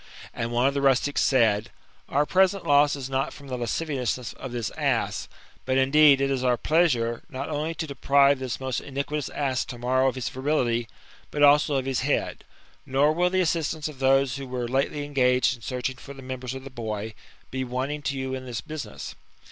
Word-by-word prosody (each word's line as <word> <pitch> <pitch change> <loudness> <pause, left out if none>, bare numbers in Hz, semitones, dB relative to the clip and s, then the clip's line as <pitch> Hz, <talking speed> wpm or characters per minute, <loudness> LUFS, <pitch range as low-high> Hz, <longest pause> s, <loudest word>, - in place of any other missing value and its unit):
And 115 0 -3
one 120 +2 +2
of 140 - +3
the 140 - -1
rustics 140 +1 +2
said: 115 -4 +3 0.2
'* - - -33
Our 145 +2 +2
present 190 +3 +2
loss 145 0 +4
is 135 -2 -5
not 135 0 -1
firom 140 -1 -12
the 130 - -2
lasciviousness 125 -1 -2
of 135 - -8
this 120 -3 -3
ass; - - -1 0.4
but, 130 0 0
indeed, 140 +1 +6
it 140 0 +1
is 130 -2 -1
our 125 -1 +2
pleasure, 125 -9 +1
not 140 -1 -5
only 155 +2 -2
to 160 - -3
deprive 140 -1 +3
this 130 -3 -4
most 130 -2 -2
iniquitous 140 +1 -3
ass 135 -3 -1
to 120 - -8
morrow 130 +2 +2
of 130 - 0
his 130 -2 -3
virility, 125 -4 0 0.4
but 145 - 0
also 145 0 +5
of 130 -1 0
his 135 -2 0
head. 140 +3 -1 0.4
Nor 140 +3 +2
will 180 +2 +2
the 185 0 +1
assistance 160 -2 -1
of 150 -4 -10
those 135 0 +3
who 135 -1 -6
were 125 -1 -3
lately 140 +3 -1
engaged 130 -2 +2
in - - -23
searching 125 +1 -3
for 140 +3 -11
the 135 - -11
members 130 0 -5
of 130 - -7
the 135 - -9
boy, 110 -3 -5 0.4
be 130 0 -2
wanting 130 +4 -3
to 140 -2 -2
you 130 0 -3
in 130 -1 -5
this 120 -2 -4
business." 155 -1 -7
135 Hz, 205 wpm, -26 LUFS, 125-145 Hz, 0.4 s, indeed